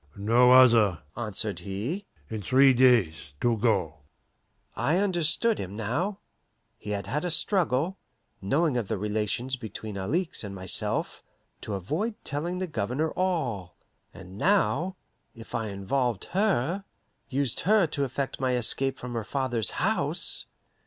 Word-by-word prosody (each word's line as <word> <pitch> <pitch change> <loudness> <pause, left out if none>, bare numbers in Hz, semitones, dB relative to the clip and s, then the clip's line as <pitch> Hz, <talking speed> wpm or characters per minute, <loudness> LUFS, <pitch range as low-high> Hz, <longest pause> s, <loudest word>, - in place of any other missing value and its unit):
"No 115 +5 +4
other," 115 -9 +6
answered 105 -4 -2
he. 110 - -4 0.2
"In 110 -1 -5
three 135 +5 +5
days 115 - +3
to 120 -1 +2
go." 95 -9 0 0.8
I 160 +4 +1
understood 195 +3 +2
him 95 +2 -5
now. 145 - -2 0.6
He 105 - -8
had 100 -2 -2
had 140 - -2
a 180 - -1
struggle, 170 -1 +1 0.4
knowing 140 - +1
of 115 -5 -2
the 110 - -2
relations 105 +5 -2
between 110 -3 -7
Alixe 160 - -1
and 100 -1 -6
myself, 95 -1 -1 0.4
to 105 - -4
avoid 160 - -2
telling 165 +5 -3
the 185 - -2
Governor 150 - -2
all. 130 - -2 0.3
And 95 +1 -12
now, 190 - +2 0.4
if 115 -1 -12
I 110 - -1
involved 105 +3 -1
her, 190 - +1 0.5
used 135 -3 0
her 210 0 +4
to 145 -2 -2
effect 135 +1 -3
my 130 -1 +1
escape 130 +2 +1
from 125 -1 -7
her 115 -2 -2
father's 120 -3 -1
house! - - +1
125 Hz, 140 wpm, -27 LUFS, 105-160 Hz, 0.8 s, other